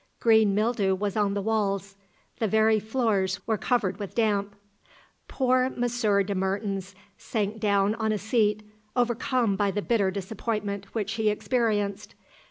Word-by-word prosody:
Green 220 -3 +4
mildew 210 -3 +1
was 200 +1 -3
on 205 -2 +1
the 200 - -2
walls. 200 -2 -1 0.4
The 220 - +1
very 220 +1 +3
floors 210 -4 0
were 220 -2 0
covered 215 -2 0
with 200 -2 -6
damp. 205 -3 0 0.7
Poor 255 -1 +2
Monsieur 240 -5 +1
de 200 +1 -3
Mertens 195 0 -2 0.2
sank 215 -1 -2
down 200 -1 +2
on 220 -1 -1
a 215 - 0
seat, 215 -1 +1 0.3
overcome 240 -2 +1
by 200 +1 +1
the 205 +1 -2
bitter 210 -5 +2
disappointment 200 +1 -3
which 210 -2 -1
he 220 -1 +1
experienced. 210 -2 -1
210 Hz, 145 wpm, -26 LUFS, 200-225 Hz, 0.7 s, Green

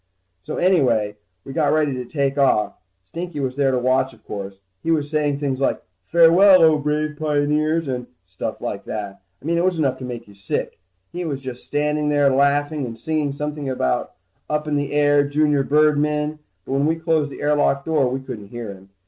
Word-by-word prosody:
So - - -6
anyway, 120 - +2 0.3
we 135 - -7
got 155 -1 +2
ready 150 -2 +2
to 125 -1 -4
take 140 +1 -1
off. 130 -7 +2 0.3
Stinky 170 - -6
was 130 -2 -2
there 140 -1 +2
to 130 - +1
watch, 130 0 +1
of 110 - -27
course. 100 -1 -7 0.2
He - - -4
was 150 -2 +1
saying 150 -2 +1
things 140 -2 -2
like, 135 - +1 0.3
farewell, 170 +2 +6
O 160 -2 +5
brave 150 +1 -1
pioneers, 155 +1 +1
and 125 -2 -3 0.2
stuff 95 +1 -6
like - - -4
that. 100 -3 -6 0.2
I - - -17
mean 170 +1 +1
it - - +1
was 185 -2 +1
enough 135 -4 0
to - - -8
make 120 -2 -7
you 100 - -15
sick. 100 0 -4 0.3
He 180 +1 -3
was 140 -5 -4 0.2
standing 150 0 0
there 145 -2 +3
laughing 145 +2 +2
and 115 -1 -8
singing 150 +2 -1
something 150 0 -4
like 95 - 0 0.4
up 150 0 -1
in 150 - 0
the 145 -1 -1
air 145 0 +4
junior 150 -1 +2
birdmen, 150 +1 +2 0.3
but - - -7
when 140 +2 +2
we 160 - +2
closed 160 -3 0
the - - -9
air 150 0 +3
lock 140 -1 +1
door, 155 -5 +2
we 130 +1 -3
couldn't 105 -6 -8
hear 115 -1 -6
him. 95 0 -16
145 Hz, 200 wpm, -21 LUFS, 130-155 Hz, 0.4 s, farewell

